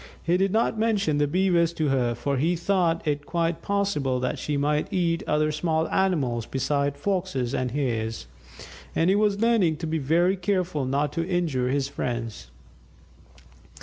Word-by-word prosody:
He 170 - +2
did 190 +1 +2
not 220 0 +1
mention 200 -9 +1
the 145 - +2
Beavers 170 0 +2
to 155 -3 0
her, 125 -3 +1
for 140 +4 -2
he 165 +7 +1
thought 170 -2 0
it 145 -1 0
quite 170 -1 -1
possible 195 -11 0
that 125 - -2
she 145 -1 -2
might 150 +1 0
eat 170 -2 +1
other 155 0 +2
small 160 +1 0
animals 140 - 0
besides 140 +1 -1
Foxes 180 -9 -1
and 130 0 -1
Hares; 115 - -2 0.7
and 165 +3 +3
he - - +3
was 205 -1 +1
learning 215 -9 +3
to 165 - -5
be 160 0 -1
very 170 +7 +2
careful 180 -6 -1
not 140 +3 0
to 165 0 -2
injure 160 -9 0
his 135 0 0
friends. 120 - -4
160 Hz, 165 wpm, -25 LUFS, 140-185 Hz, 0.7 s, and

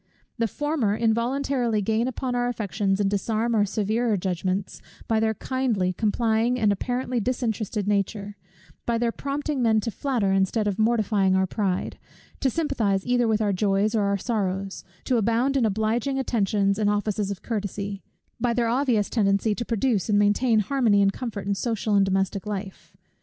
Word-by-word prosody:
The 230 - +2
former 290 -5 -1
involuntarily 235 +1 0
gain 220 +4 +1
upon 255 0 -3
our 245 0 0
affections 205 -4 -1
and 205 - +2
disarm 220 +3 0
our 210 -2 +3
severer 215 +2 0
judgments, 185 +1 -2 0.3
by 225 -1 +2
their 220 0 +1
kindly, 230 -9 -1
complying, 225 +3 +1
and 210 -3 +3
apparently 245 +4 -1
disinterested 220 -3 -2
nature; 205 0 -1 0.5
by 235 -1 +1
their 235 0 +1
prompting 280 +1 -3
men 220 -2 +3
to 230 - -3
flatter 230 -3 0
instead 195 +3 +1
of 205 0 -2
mortifying 215 -4 +2
our 190 0 +3
pride, 190 -1 -2 0.4
to 270 - +2
sympathize 235 -11 0
either 245 -1 +2
with 220 -1 +1
our 205 -1 +1
joys 200 +2 +1
or 215 -3 +2
our 200 0 +1
sorrows, 195 -3 -2 0.2
to 250 - +1
abound 230 +5 +1
in 245 -5 +3
obliging 220 +6 0
attentions 205 -5 +1
and 210 -1 +2
offices 205 -1 -1
of 200 -2 -6
courtesy; 200 -2 -4 0.4
by 245 -1 +1
their 240 -1 +1
obvious 240 -4 +1
tendency 200 -1 +1
to 235 - -3
produce 230 -2 0
and 205 - +3
maintain 215 +2 +3
harmony 220 -4 +2
and 195 0 +2
comfort 220 -6 -5
in 200 - +1
social 220 +1 -1
and 200 -1 +5
domestic 195 +1 -1
life. 200 -2 -6
215 Hz, 170 wpm, -25 LUFS, 200-240 Hz, 0.5 s, and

